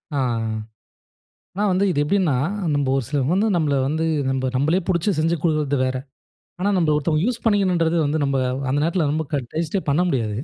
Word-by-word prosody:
ஆ. - - 0 1.4
நான் 205 -1 +2
வந்து 185 +2 +2
இது 145 - 0
எப்படின்னா, 175 -2 +1 0.4
நம்ப 145 -2 0
ஒரு 135 - -1
சிலர் 140 -1 0
வந்து 200 +4 +2
நம்மள 150 -4 +1
வந்து 160 +3 -1 0.3
நம்ப 130 0 -1
நம்மளே 155 +8 +2
புடிச்சு 185 +2 +1
செஞ்சு 165 +2 +1
குடுகறது 155 -4 +1
வேற. 130 0 -2 0.6
ஆனா 200 +2 +1
நம்பள 160 -4 +2
ஒருத்தவங்க 155 +2 0
யூஸ் 240 -1 -2
பண்ணிகணும்ன்றது 185 -6 +2
வந்து 150 +2 0
நம்ம 140 -1 0 0.3
அந்த 135 +2 +1
நேரத்துல 170 0 +1
நம்ம 155 0 -2
க - - +2 0.2
டேஸ்ட்டே 165 +4 -1
பண்ண 145 +4 +2
முடியாது. 115 -9 -1
160 Hz, 180 wpm, -22 LUFS, 145-180 Hz, 1.4 s, நான்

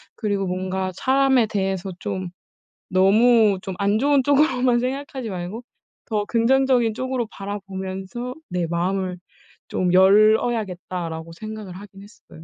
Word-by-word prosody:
그리고 205 -3 -1
뭔가 185 +1 -2
사람에 265 -3 +3
대해서 195 -2 -2
좀 185 -3 -4 0.6
'너무 210 +3 +4
좀 190 - -5
안 200 +2 +2
좋은 280 0 +3
쪽으로만 260 -3 +3
생각하지 260 -2 -4
말고, 185 +5 -6 0.4
더 210 -2 -1
긍정적인 240 0 +2
쪽으로 255 0 -2
바라보면서 195 +4 -6
내 175 -2 -1
마음을 180 +2 -1 0.5
좀 180 -1 0
열어야겠다.'라고 190 -5 +2
생각을 215 +1 -8
하긴 195 +1 -12
했어요. 200 -5 -16
205 Hz, 295 characters per minute, -22 LUFS, 185-240 Hz, 0.6 s, 너무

